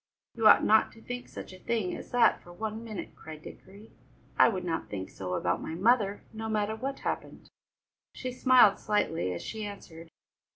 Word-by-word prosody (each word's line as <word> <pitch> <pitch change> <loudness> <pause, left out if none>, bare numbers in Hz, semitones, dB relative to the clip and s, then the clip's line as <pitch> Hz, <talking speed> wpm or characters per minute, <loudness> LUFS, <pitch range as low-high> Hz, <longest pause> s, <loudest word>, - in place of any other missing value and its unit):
"You 225 -2 +3
ought - - +8
not 220 +1 +4
to 225 - -16
think 245 0 -6
such - - -9
a 185 - -12
thing 220 -3 -1
as - - -9
that 245 -1 +4
for 175 - -14
one 220 +4 -5
minute," 215 -4 -7
cried 155 -1 -11
Dickory. 200 +3 -13 0.4
"I - - +6
would 190 -5 -3
not 165 -2 -3
think 95 -2 -5
so 90 -1 -4
about 90 0 0
my 160 - -5
mother, 205 +1 +2
no 220 0 -5
matter 215 0 0
what 270 +4 -5
happened!" - - -5 0.6
She 255 - -5
smiled 250 -5 +5
slightly 165 - 0
as 90 - -5
she 220 -1 -5
answered. 170 -5 -9
210 Hz, 190 wpm, -29 LUFS, 175-225 Hz, 0.6 s, ought